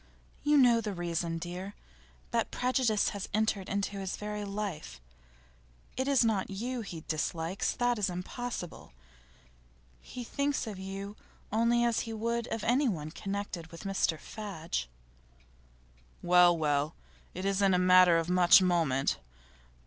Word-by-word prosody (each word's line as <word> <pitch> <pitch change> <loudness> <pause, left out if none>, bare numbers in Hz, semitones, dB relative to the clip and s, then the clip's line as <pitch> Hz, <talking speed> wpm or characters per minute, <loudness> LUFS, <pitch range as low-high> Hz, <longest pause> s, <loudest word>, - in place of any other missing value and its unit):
'You 295 0 +3
know 240 -4 +5
the 210 -3 -4
reason, 170 -1 -2
dear. 180 +4 -6 0.6
That 230 -1 0
prejudice 250 -4 +1
has 200 -1 -6
entered 215 -3 0
into 200 0 -2
his 190 -1 -4
very 210 0 -4
life. 195 - -5 1.0
It 260 +1 -1
is 275 -4 +4
not 210 -4 0
you 235 +6 -3
he 175 -6 -7
dislikes; 165 +3 -2
that 245 -2 0
is 200 - +1
impossible. 180 - -6 1.1
He 245 - -8
thinks 280 +3 -1
of 210 -4 -6
you 195 +2 -6 0.3
only 235 +2 +3
as 235 -2 +2
he 225 - -4
would 235 +1 -2
of 225 - -4
anyone 225 - +1
connected 195 -3 -5
with 165 +3 -11
Mr 195 -4 0
Fadge.' 165 - -5 1.4
'Well, 175 -1 +6
well; 150 0 0 0.4
it 185 +2 -4
isn't 195 0 +2
a - - +3
matter 180 -1 +6
of 165 0 -1
much 180 0 +7
moment. 165 -8 +1
195 Hz, 135 wpm, -30 LUFS, 175-225 Hz, 1.4 s, much